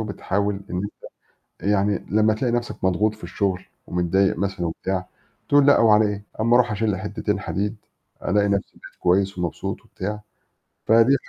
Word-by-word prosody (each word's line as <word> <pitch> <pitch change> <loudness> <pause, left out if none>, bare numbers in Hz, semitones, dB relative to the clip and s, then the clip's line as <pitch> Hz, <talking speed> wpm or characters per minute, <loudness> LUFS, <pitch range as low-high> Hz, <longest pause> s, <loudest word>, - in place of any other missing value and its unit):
وبتحاول 100 -1 -1 0.2
إنّك 95 +3 -2 0.7
أنت 100 - -1
يعني 100 -1 +1
لمّا 110 +2 +3
تلاقي 120 +3 -1
نفْسك 120 0 -3
مضغوط 105 +4 +2
في 110 - -20
الشغل 95 -3 -2 0.2
ومتضايق 90 +2 +1
مثلًا 95 -2 -2
وبتاع 95 +2 -3 0.4
بتقول 145 -1 +5
لأ 140 - +6
وعلى 110 -1 +6
إيه 105 0 -3
أمّا 115 +2 +3
أرُوح 120 -2 +4
أشيلّي 105 -1 0
حتتين 105 +1 -2
حديد 100 +4 -2 0.5
ألاقي 105 +1 +2
نفْسي 100 -1 -1
بقيت - - -14
كويس 95 +2 +2
ومبسوط 85 -2 -3
وبتاع. 105 +3 -5 0.6
فدي 115 +4 +5
100 Hz, 155 wpm, -23 LUFS, 95-110 Hz, 0.7 s, لأ